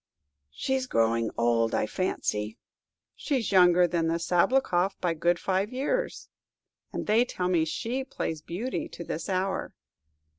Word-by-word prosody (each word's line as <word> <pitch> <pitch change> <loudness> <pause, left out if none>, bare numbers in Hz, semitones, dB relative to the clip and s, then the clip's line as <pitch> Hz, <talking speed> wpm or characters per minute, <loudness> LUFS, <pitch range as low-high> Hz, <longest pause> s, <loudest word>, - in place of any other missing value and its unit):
"She's 260 - -2
growing 115 - +2
old, 115 -1 +2
I - - +1
fancy." 110 - -2 0.6
"She's 260 -9 -1
younger 180 -2 +6
than 170 -1 0
the 165 +1 +1
Sabloukoff 180 +1 +2
by 175 -2 0
five 160 - -13
good 185 +5 +1
years, 295 - -2 0.6
and - - -4
they 220 +3 +4
tell 180 -7 -2
me 170 -3 +3
she 240 +10 -2
plays 160 - -4
Beauty 210 +12 -4
to 170 - -8
this 165 +1 -5
hour." 190 +1 -1
180 Hz, 140 wpm, -28 LUFS, 160-225 Hz, 0.6 s, younger